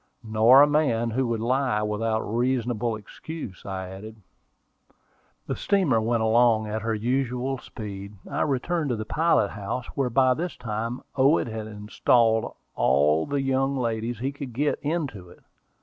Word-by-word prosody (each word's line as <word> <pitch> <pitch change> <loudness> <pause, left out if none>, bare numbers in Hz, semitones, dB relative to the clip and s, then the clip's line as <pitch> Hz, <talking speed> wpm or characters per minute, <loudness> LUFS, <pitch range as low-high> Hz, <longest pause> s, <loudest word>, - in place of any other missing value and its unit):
"Nor 115 +5 +6
a - - +5
man 135 -6 +1
who 130 +2 0
would 115 -1 -1
lie 125 -3 +1
without 110 +1 -1
a - - -6
reasonable 120 -1 0
excuse," 110 - -9
I 95 -1 -4
added. 100 +4 -9 1.3
The - - -3
steamer 175 - +2
went 115 0 +1
along 110 -1 +4
at 110 +1 -3
her 110 0 -1
usual 125 +3 -1
speed. 100 -3 -8
I - - -2
returned 150 +3 0
to 120 - 0
the 110 -1 -5
pilot 155 -5 +2
house, 105 +5 -4
where 135 -3 0
by 130 +1 +4
this 170 +3 -4
time 115 +2 -4
Owen 140 +4 +4
had 110 -1 -5
installed 110 +2 +1 0.2
all 75 +4 +3
the 145 -1 -1
young 135 +1 +1
ladies 115 -1 -2
he 130 +5 -2
could 140 -3 -8
get 145 +5 0
into 140 - -3
it. - - -18
115 Hz, 160 wpm, -25 LUFS, 110-135 Hz, 1.3 s, Nor